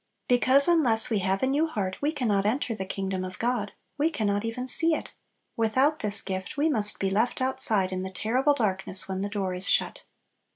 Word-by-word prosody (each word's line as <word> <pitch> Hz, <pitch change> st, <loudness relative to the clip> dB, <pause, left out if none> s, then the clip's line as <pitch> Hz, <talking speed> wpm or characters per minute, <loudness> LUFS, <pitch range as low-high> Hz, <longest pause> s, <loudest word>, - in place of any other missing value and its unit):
Because 255 Hz, +3 st, +4 dB
unless 250 Hz, -11 st, +3 dB
we 215 Hz, -, +1 dB
have 190 Hz, +2 st, -2 dB
a -, -, +4 dB
new 290 Hz, +5 st, 0 dB
heart 195 Hz, -10 st, -5 dB
we 290 Hz, +2 st, 0 dB
can 275 Hz, -6 st, -3 dB
not 200 Hz, -1 st, +1 dB
enter 230 Hz, +3 st, -1 dB
the 190 Hz, -3 st, -6 dB
kingdom 190 Hz, -1 st, -4 dB
of 185 Hz, 0 st, -8 dB
God, 235 Hz, -4 st, -2 dB, 0.3 s
we 305 Hz, +3 st, +2 dB
can 235 Hz, -10 st, -4 dB
not 205 Hz, 0 st, -1 dB
even 240 Hz, +3 st, -5 dB
see 325 Hz, +5 st, +8 dB
it! -, -, -7 dB, 0.4 s
Without 260 Hz, +7 st, +1 dB
this 205 Hz, -1 st, 0 dB
gift 190 Hz, +10 st, -6 dB
we 300 Hz, +3 st, +1 dB
must 210 Hz, -7 st, 0 dB
be 195 Hz, -1 st, -2 dB
left 225 Hz, +5 st, -1 dB
outside 255 Hz, -7 st, 0 dB
in 185 Hz, 0 st, -4 dB
the 190 Hz, -, -5 dB
terrible 250 Hz, +9 st, 0 dB
darkness 195 Hz, -5 st, -1 dB
when 190 Hz, 0 st, -4 dB
"the 200 Hz, -, -3 dB
door 195 Hz, -3 st, -3 dB
is 180 Hz, +2 st, +1 dB
shut." -, -, 0 dB
220 Hz, 215 wpm, -26 LUFS, 195-260 Hz, 0.4 s, see